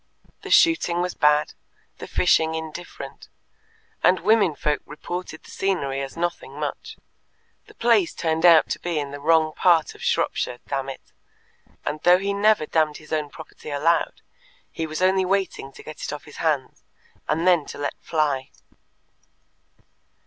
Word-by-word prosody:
The - - -8
shooting 315 - +4
was 180 - -2
bad, 150 0 +3 0.5
the - - -7
fishing 160 -2 +2
indifferent, 160 +2 -8 0.7
and 185 - +5
women 205 -7 +3
folk 150 0 -1
reported 165 +1 -7
the - - -14
scenery 140 -9 -1
as 135 +3 -7
nothing 175 0 -3
much. - - -5 0.7
The 425 - -17
place 230 - +3
turned 160 0 -1
out 170 -2 +7
to - - -2
be 175 -2 -3
in 145 -2 -3
the 145 - -7
wrong 160 +1 +3
part 165 -3 +3
of - - -16
Shropshire, 125 - 0
damn 135 -1 -2
it, 135 - -10 0.7
and 150 - -2
though 180 +1 +6
he 200 +2 -2
never 205 -4 +3
damned 155 -1 +1
his 155 0 -10
own 150 -2 -1
property 155 0 -11
aloud, 155 +4 0 0.5
he 160 - -4
was 155 +3 -3
only 190 0 +3
waiting 185 -7 -1
to - - -13
get 155 - -9
it - - -3
off 150 - -7
his 150 - -13
hands, 150 -5 -1 0.5
and 160 +4 0
then 175 -5 +4
to - - -8
let 145 0 -2
fly. 145 -4 -1
160 Hz, 160 wpm, -23 LUFS, 150-180 Hz, 0.7 s, out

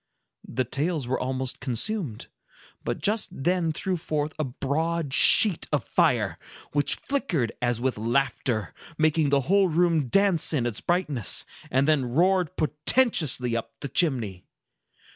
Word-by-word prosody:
The 130 - -1
tales 145 +3 -2
were 130 - -1
almost 130 0 -3
consumed, 130 - -3 0.6
but - - -2
just 215 +2 0
then 175 +3 0
threw 185 +3 -2
forth 155 -2 -3
a - - +1
broad 145 +3 -2
sheet 195 +4 +5
of 145 -6 0
fire, - - +1 0.3
which 145 0 0
flickered 180 - -2
as 120 -1 0
with 125 -3 -2
laughter, 120 -2 -1 0.2
making 155 -1 +2
the 140 0 +2
whole 195 +7 +3
room 165 -3 +1
dance 190 - +2
in 130 -6 0
its 120 -4 -3
brightness, 150 - 0 0.2
and 135 +2 +1
then 150 -4 +2
roared 175 +6 +1
portentously 150 - +2
up 115 - -6
the 140 - -5
chimney. 120 - +1
150 Hz, 140 wpm, -25 LUFS, 130-175 Hz, 0.6 s, sheet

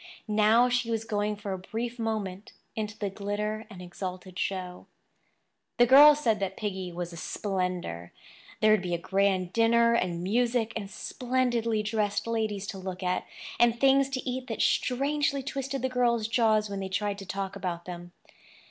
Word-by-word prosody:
Now 215 +3 +4
she 245 -1 0
was 225 -1 -1
going 210 -1 -1
for 205 -1 -5
a 190 - -4
brief 235 +5 -5
moment 210 -3 -3 0.2
into 215 -1 -4
the 200 -2 -3
glitter 210 +2 -3
and 185 -4 -10
exalted 185 +1 -7
show. 180 -2 -4 0.9
The 240 - +6
girls 290 +4 +8
said 225 -6 +2
that 195 -1 -3
Piggy 190 -4 -4
was 175 0 -5
a - - -9
"spender." 180 - -3 0.5
There 215 - +5
would 215 - +4
be 175 -2 -1
a - - -1
grand 190 0 0
dinner, 235 0 +4
and 175 -6 0
music, 230 +3 +1
and 205 -3 -4
splendidly 240 -3 -1
dressed 210 -1 -1
ladies 220 -3 -1
to 195 - -6
look 185 0 -6
at, 180 0 -1 0.3
and 235 0 +4
things 275 +1 +4
to 265 -1 -4
eat 255 0 -3
that - - -1
strangely 280 +2 +1
twisted 275 0 -4
the - - +2
girls' 240 -3 +1
jaws 220 -2 +2
when 200 -1 -5
they 190 -1 -4
tried 205 +1 -2
to 195 - -8
tell 195 0 -3
about 180 -3 -4
them. 175 -1 -8
210 Hz, 175 wpm, -28 LUFS, 190-235 Hz, 0.9 s, girls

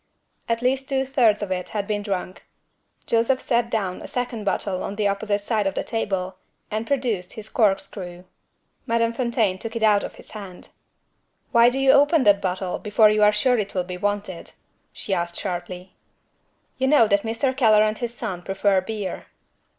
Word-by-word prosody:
At 230 +1 0
least 265 +2 0
two 270 -1 +1
thirds 235 -6 +2
of 195 - -5
it 180 -1 -3
had 205 -2 -3
been 205 0 -2
drunk. 190 -3 -4 0.6
Joseph 235 +3 +2
set 235 -2 0
down 195 -6 -2
a - - -8
second 245 -3 -3
bottle 195 -2 -1
on 200 - -4
the 205 -1 +1
opposite 205 +1 -1
side 210 -1 0
of 195 - -2
the - - -1
table, 190 -5 -3 0.3
and 220 +2 -3
produced 235 -10 -1
his 220 -1 -8
corkscrew. 195 -4 -1 0.6
Madame 230 0 +1
Fontaine 230 -6 0
took 225 +2 -6
it 230 - -2
out 210 -2 +4
of - - -7
his - - -15
hand. 195 -4 -10 0.8
"Why 235 -1 +6
do 250 - -4
you 270 0 +5
open 290 +2 +4
that 200 -2 +4
bottle, 185 0 -2
before 210 0 +4
you 215 0 +1
are 210 0 +6
sure 240 +3 +2
it 200 -2 -4
will 180 - +1
be 180 0 -6
wanted?" 205 -1 -3 0.4
She 200 - -4
asked 170 -1 -2
sharply. 180 -1 -5 0.9
"You 265 - +2
know 270 -5 +5
that 200 -1 +2
Mr. 230 +4 -1
Keller 215 -5 +5
and 215 0 -1
his 240 -1 -3
son 190 -7 -4
prefer 195 +1 +1
beer." 205 0 -5
210 Hz, 185 wpm, -23 LUFS, 195-235 Hz, 0.9 s, Why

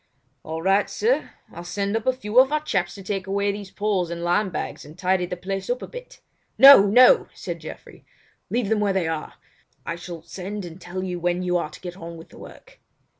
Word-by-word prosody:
"All 160 +1 -6
right 195 +2 +3
sir. 470 +3 0 0.2
I'll 170 - -8
send 200 +4 -2
up 225 +1 -2
a - - +6
few 240 -2 +1
of 265 +2 +5
our 305 0 0
chaps 180 -11 -1
to 195 - -10
take 195 -1 -3
away 200 +1 0
these 200 -1 -7
poles 195 -4 -1
and 170 0 -5
lime 185 +4 +1
bags 170 - -5
and 150 +3 -14
tidy 180 -1 +1
the 180 - -5
place 195 +2 -5
up 245 +1 -1
a - - -6
bit." - - -11 0.4
"No! 270 -7 +10
No!" 255 - +6
said - - -6
Geoffrey, - - -11 0.5
"leave 235 -4 -1
them 220 -1 +2
where 205 -2 +1
they 185 -4 0
are. 160 -1 -4 0.5
I - - -3
shall 170 -1 -9
send 190 +3 -6
and 175 +2 -11
tell 185 +2 -5
you 180 -2 -4
when 175 +1 -1
you 180 0 0
are 170 - -3
to - - -14
get 180 0 -7
on 170 -1 -8
with 165 - -13
the - - -15
work." - - -14
190 Hz, 225 wpm, -23 LUFS, 175-210 Hz, 0.5 s, No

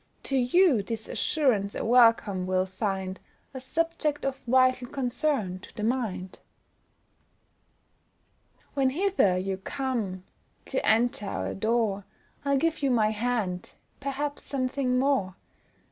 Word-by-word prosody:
To 275 - -2
you 265 - +4
this 220 +2 -5
assurance 230 -10 +1
a - - -3
welcome 230 -6 +4
will 185 0 +1
find, 190 -1 -3 0.3
A 260 - -6
subject 310 +1 -1
of 270 0 -2
vital 255 0 +3
concern 250 - -1
to - - -15
the 210 - -5
mind. 215 -6 -2 2.3
When 270 -2 +2
hither 325 - +2
you 190 +1 -2
come, 215 -4 -3 0.4
do - - -1
enter 220 -2 +2
our - - -3
door, 215 -2 0 0.4
I'll 280 -1 +2
give 325 +2 0
you 275 - +2
my 220 -4 +3
hand, 215 -5 -2 0.2
perhaps 280 +1 -3
something 255 -1 -1
more. 255 -9 +1
245 Hz, 120 wpm, -27 LUFS, 200-275 Hz, 2.3 s, you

